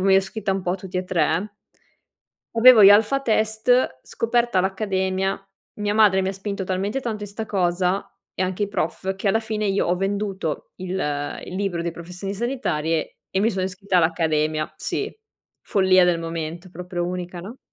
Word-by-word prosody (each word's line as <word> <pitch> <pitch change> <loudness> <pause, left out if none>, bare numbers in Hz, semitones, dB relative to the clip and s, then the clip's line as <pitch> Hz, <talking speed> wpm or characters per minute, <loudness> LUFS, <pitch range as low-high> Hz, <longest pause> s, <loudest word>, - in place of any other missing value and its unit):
mi 190 +1 +4
ero - - +7
iscritta 195 +2 -1
un 190 -1 -2
po' 175 - -1
a 180 - +1
tutti 185 -1 -7
e 185 - -1
tre. 185 +3 0 1.0
Avevo 230 -1 +8
gli 195 - +10
alpha 220 +7 +5
test, 220 - +2
scoperta 235 -3 +1
l'accademia, 190 0 -1 0.4
mia 205 0 0
madre 210 -3 +5
mi 190 - -1
ha - - -1
spinto 195 0 -4
talmente 195 +7 -1
tanto 220 -5 -4
in - - -8
'sta 215 +3 -5
cosa 180 -1 0 0.2
e - - -1
anche 185 +2 -2
i 205 - -7
prof 190 -1 -2
che 195 +1 -1
alla 220 - +3
fine 215 -1 -2
io 195 0 +1
ho 175 - +2
venduto 195 -4 -3
il 185 -1 -7 0.5
il - - -8
libro 190 -3 -1
di 170 - -2
professioni 180 +4 -6
sanitarie 175 - -2
e 190 - 0
mi 220 +3 +3
sono 190 -3 -2
iscritta 190 0 0
all'accademia. 155 -2 +1
Sì, - - -3 0.5
follia 185 -2 +4
del 170 -1 +2
momento. 165 +2 -5
Proprio 175 0 -4
unica, 180 -1 -5
no? 215 +9 -9
190 Hz, 180 wpm, -23 LUFS, 180-210 Hz, 1.0 s, gli